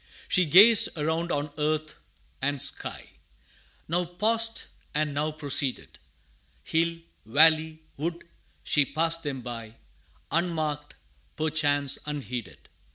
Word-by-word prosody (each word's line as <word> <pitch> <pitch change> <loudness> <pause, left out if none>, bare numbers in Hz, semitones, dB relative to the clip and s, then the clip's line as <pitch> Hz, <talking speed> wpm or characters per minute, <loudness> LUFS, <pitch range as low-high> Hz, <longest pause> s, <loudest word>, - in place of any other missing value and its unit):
She 185 -2 +3
gazed 200 +8 +7
around 160 +3 -1
on 145 0 -2
earth 155 +1 -1 0.5
and 140 +1 0
sky - - -4 0.8
Now 175 +3 +1
paused, 220 +6 0 0.3
and 150 -1 0
now 150 +2 -1
proceeded; 145 -3 -1 0.6
Hill, 165 - 0 0.3
valley, 155 +5 +4
wood, 165 +4 -3 0.4
she 145 - +3
passed 165 +4 -1
them 140 -4 -4
by, 115 -2 -7 0.6
Unmarked, 155 -3 -1 0.4
perchance 145 -3 +1
unheeded. 125 - -6
155 Hz, 100 wpm, -27 LUFS, 145-165 Hz, 0.8 s, gazed